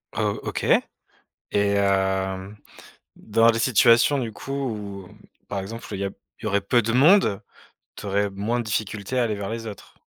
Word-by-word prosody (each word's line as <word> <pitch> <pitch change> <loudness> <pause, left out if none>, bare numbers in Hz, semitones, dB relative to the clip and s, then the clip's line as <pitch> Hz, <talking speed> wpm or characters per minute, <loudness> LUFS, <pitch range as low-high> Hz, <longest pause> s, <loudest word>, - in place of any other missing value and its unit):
O - - -1 0.2
OK - - -4 0.7
et 100 0 -1
hem 95 0 0 0.6
dans 115 +2 +3
les 115 - -1
situations 115 +4 +4
du 115 -4 -3
coup 135 - -8
où 105 -8 -4 0.4
par 100 - -3
exemple 115 +4 -7
il 95 - -4
y 100 - -1
a 100 - -2
p - - -19 0.2
il - - -11
y - - -2
aurait 100 0 +1
peu 120 +4 +3
de 115 0 -2
monde, 135 - +5 0.5
tu - - -9
aurais 100 +1 0
moins 105 +5 -2
de - - -4
difficultés 110 +2 -2
à - - +3
aller 110 -3 0
vers 100 -1 -5
les 115 0 -5
autres? 105 -3 -10
105 Hz, 190 wpm, -24 LUFS, 100-115 Hz, 0.7 s, monde